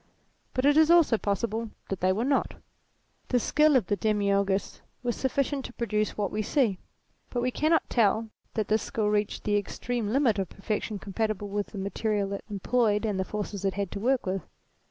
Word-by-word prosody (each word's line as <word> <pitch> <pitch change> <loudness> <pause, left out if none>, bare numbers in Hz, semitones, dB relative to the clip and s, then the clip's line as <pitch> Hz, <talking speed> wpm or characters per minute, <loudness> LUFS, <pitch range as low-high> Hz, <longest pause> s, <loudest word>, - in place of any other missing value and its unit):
But 255 +1 +1
it 290 +1 +5
is 315 0 +6
also 335 -10 +5
possible 220 +3 -1 0.2
that 195 - -2
they 185 +1 +3
were 215 +6 0
not. 275 0 +1 0.7
The 250 - +2
skill 300 +4 +3
of 245 -7 +4
the 205 - 0
Demiourgos 200 -1 0 0.2
was 240 -1 0
sufficient 275 +1 -1
to - - -8
produce 215 -3 -1
what 205 -2 -1
we 215 - -1
see; 215 -3 +1 0.5
but 245 - -2
we 250 +1 0
cannot 315 +5 +2
tell 225 -1 +2 0.3
that 215 -3 0
this 215 +1 +2
skill 215 -2 -1
reached 210 0 0
the 205 -1 +2
extreme 230 +3 -3
limit 235 -4 +2
of 190 - -2
perfection 210 +1 -3
compatible 205 0 -2
with 205 0 -2
the 210 - -10
material 200 +1 -1
it 200 - -5
employed 210 +1 +1
and 205 -3 -1
the - - +2
forces 205 0 -5
it 195 -1 0
had 200 -2 -2
to 200 - -4
work 255 +4 +1
with. 190 0 -1
215 Hz, 195 wpm, -28 LUFS, 200-245 Hz, 0.7 s, is